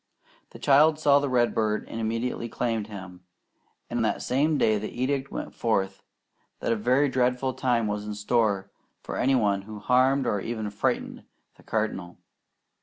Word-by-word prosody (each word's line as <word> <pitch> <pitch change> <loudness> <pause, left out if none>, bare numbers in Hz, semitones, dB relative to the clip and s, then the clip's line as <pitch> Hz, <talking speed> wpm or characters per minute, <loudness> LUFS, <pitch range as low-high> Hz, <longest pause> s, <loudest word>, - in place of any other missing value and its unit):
The - - -12
child 150 +3 +5
saw 145 -2 +5
the 140 -1 -1
redbird 115 -4 +1
and 115 - -5
immediately 115 +1 -2
claimed 115 -3 -2
him, 95 -4 -10 0.6
and - - -1
that - - -1
same 145 +4 +1
day 110 -5 +3
the 110 - -4
edict 135 +2 -2
went - - -5
forth 100 -4 -1 0.6
that - - -1
a - - +3
very 125 +6 +2
dreadful 130 0 +1
time 120 -3 +1
was 105 0 -2
in 105 - -4
store 105 -2 0 0.3
for - - -5
any 135 +1 +3
one 100 -5 +2
who 105 +2 -9
harmed 130 +4 +3
or 105 -4 0
even 110 -2 -4
frightened 105 - -2 0.3
the - - -19
Cardinal. 100 -5 -3
115 Hz, 165 wpm, -26 LUFS, 105-130 Hz, 0.6 s, child